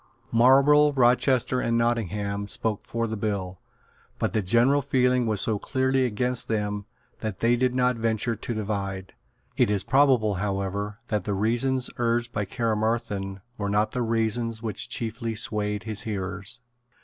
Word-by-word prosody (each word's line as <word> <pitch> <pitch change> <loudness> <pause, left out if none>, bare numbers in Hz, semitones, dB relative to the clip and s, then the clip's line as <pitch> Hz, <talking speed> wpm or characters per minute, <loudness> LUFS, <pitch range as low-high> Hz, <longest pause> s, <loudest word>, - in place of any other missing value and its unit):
Marlborough, 140 +5 +5
Rochester 125 0 +3
and 115 0 +1
Nottingham 105 -3 -1
spoke 105 0 -3
for 115 0 -1
the 110 -1 -3
bill; 100 -4 -3 0.6
but - - -1
the 110 - +1
general 120 +8 +3
feeling 125 -3 +2
was 105 -3 +1
so 110 -3 0
clearly 130 +1 +1
against 125 +2 -1
them 105 -2 -2 0.3
that 110 -3 -4
they 120 +1 +3
did 125 +1 0
not 125 -1 +2
venture 115 +1 0
to 120 - -5
divide. 100 -3 -4 0.4
It - - +3
is 100 -2 0
probable, 130 -6 +3
however, 100 +1 -2
that 105 -5 -1
the 100 - -1
reasons 120 +5 +1
urged 120 0 0
by 105 - -1
Caermarthen 110 -4 -2 0.2
were 100 -1 -1
not 105 +1 +1
the 125 - -2
reasons 115 0 -1
which 110 -2 -3
chiefly 115 0 -3
swayed 105 -1 -1
his 110 -2 -4
hearers. 100 +2 -5
110 Hz, 150 wpm, -26 LUFS, 105-120 Hz, 0.6 s, Marlborough